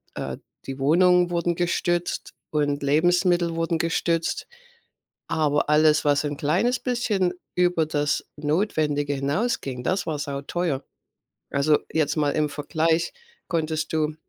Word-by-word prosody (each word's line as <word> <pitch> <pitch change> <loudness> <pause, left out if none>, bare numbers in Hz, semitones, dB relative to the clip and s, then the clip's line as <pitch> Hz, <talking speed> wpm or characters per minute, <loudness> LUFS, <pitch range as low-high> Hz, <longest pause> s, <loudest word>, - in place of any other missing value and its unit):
äh, - - -4 0.3
die 135 0 -6
Wohnungen 175 +5 +4
wurden 170 0 0
gestützt 175 0 -1 0.2
und 145 -1 0
Lebensmittel 175 +3 +2
wurden 165 0 0
gestützt, 165 0 -1 0.8
aber 150 -2 +1
alles, 150 0 +4
was 145 0 +3
'n 145 -1 -3
kleines 185 - +1
bisschen 215 -8 0 0.2
über 180 -2 +2
das 145 -1 0
Notwendige 150 -2 0
hinausging, 140 - -2
das 185 +7 0
war 155 -2 -1
sauteuer. 145 +1 -2 0.7
Also, 145 +2 +3
jetzt 150 -2 +1
mal 150 -2 +2
im 150 0 +1
Vergleich 160 +3 0 0.4
konntest 155 -2 -1
du 155 -1 0
155 Hz, 120 wpm, -24 LUFS, 145-175 Hz, 0.8 s, Wohnungen